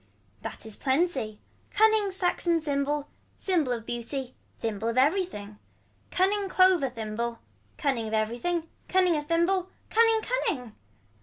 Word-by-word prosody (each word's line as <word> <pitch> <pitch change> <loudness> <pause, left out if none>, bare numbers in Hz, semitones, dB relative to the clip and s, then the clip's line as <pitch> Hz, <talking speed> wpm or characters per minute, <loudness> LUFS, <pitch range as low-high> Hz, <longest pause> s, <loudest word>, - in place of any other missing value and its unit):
That - - -7
is 220 -2 -6
plenty. 265 -7 0 0.3
Cunning 435 -1 +4
saxon 355 -2 +1
symbol. 290 -1 -1 0.3
Symbol 335 -9 +1
of 230 -2 -3
beauty. 245 +2 -4 0.2
Thimble 220 -1 -3
of 230 +1 -1
everything. 260 - +1 0.5
Cunning 390 +1 +1
clover 370 -7 +4
thimble. 230 0 -3 0.4
Cunning 265 -8 0
of 215 - -5
everything. 245 +11 -1 0.2
Cunning 370 -2 +3
of 295 -1 -3
thimble. 350 +3 +2 0.2
Cunning 450 0 +4
cunning. 355 - -1
295 Hz, 125 wpm, -28 LUFS, 235-370 Hz, 0.5 s, Cunning